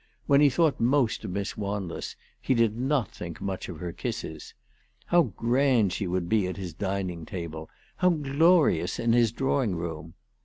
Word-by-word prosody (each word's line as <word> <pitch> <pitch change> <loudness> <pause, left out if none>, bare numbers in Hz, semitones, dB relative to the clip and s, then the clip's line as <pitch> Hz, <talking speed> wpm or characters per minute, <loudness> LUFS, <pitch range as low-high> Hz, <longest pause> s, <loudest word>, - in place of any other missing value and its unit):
"When 140 0 +5
he 145 - +7
thought 155 +2 +2
most 125 0 +2
of - - -4
Miss 100 +2 -3
Wanless 100 -4 -4 0.3
he 130 - +1
did 115 -2 +2
not 130 -3 0
think 85 -2 -8
much 95 -1 -4
of 85 - -7
her 85 +2 -5
kisses. 80 -2 -6 0.5
How 175 0 +4
grand 120 - +2
she 100 - -2
would 90 -1 -1
be 105 -1 +2
at 90 - -5
his 90 -4 -6
dining 95 -2 -3
table, 80 -2 -6 0.3
how 180 - +4
glorious 150 - +3
in 115 -1 +1
his 120 -2 +4
drawing 130 -5 0
room 80 -1 -6
105 Hz, 170 wpm, -27 LUFS, 90-135 Hz, 0.5 s, he